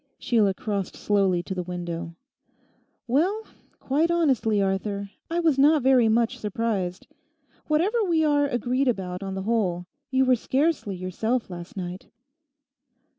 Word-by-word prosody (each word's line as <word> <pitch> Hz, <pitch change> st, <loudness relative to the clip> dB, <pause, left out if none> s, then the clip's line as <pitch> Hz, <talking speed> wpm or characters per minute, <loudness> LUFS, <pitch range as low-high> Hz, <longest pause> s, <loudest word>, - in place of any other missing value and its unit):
Sheila 210 Hz, -6 st, +2 dB
crossed 200 Hz, -3 st, -3 dB
slowly 195 Hz, -4 st, +1 dB
to 190 Hz, -, -5 dB
the 185 Hz, -, -3 dB
window. 175 Hz, -1 st, -5 dB, 0.9 s
'Well, 345 Hz, -, +1 dB, 0.4 s
quite 300 Hz, +5 st, +1 dB
honestly, 265 Hz, -11 st, +2 dB
Arthur, 200 Hz, +1 st, -1 dB, 0.2 s
I 335 Hz, +1 st, 0 dB
was 320 Hz, -5 st, +2 dB
not 295 Hz, 0 st, +5 dB
very 255 Hz, -4 st, +5 dB
much 235 Hz, +2 st, +1 dB
surprised. 205 Hz, -4 st, -2 dB, 0.6 s
Whatever 380 Hz, +10 st, +2 dB
we 325 Hz, -3 st, +2 dB
are 290 Hz, -1 st, +3 dB
agreed 250 Hz, +2 st, 0 dB
about 185 Hz, -6 st, -2 dB
on 195 Hz, -1 st, -4 dB
the 190 Hz, -, -4 dB
whole, 190 Hz, -6 st, 0 dB, 0.2 s
you 265 Hz, 0 st, +2 dB
were 255 Hz, 0 st, +5 dB
scarcely 265 Hz, -, 0 dB
yourself 190 Hz, +6 st, -2 dB
last 175 Hz, +5 st, -9 dB
night. 180 Hz, 0 st, -6 dB
225 Hz, 135 wpm, -25 LUFS, 190-275 Hz, 0.9 s, not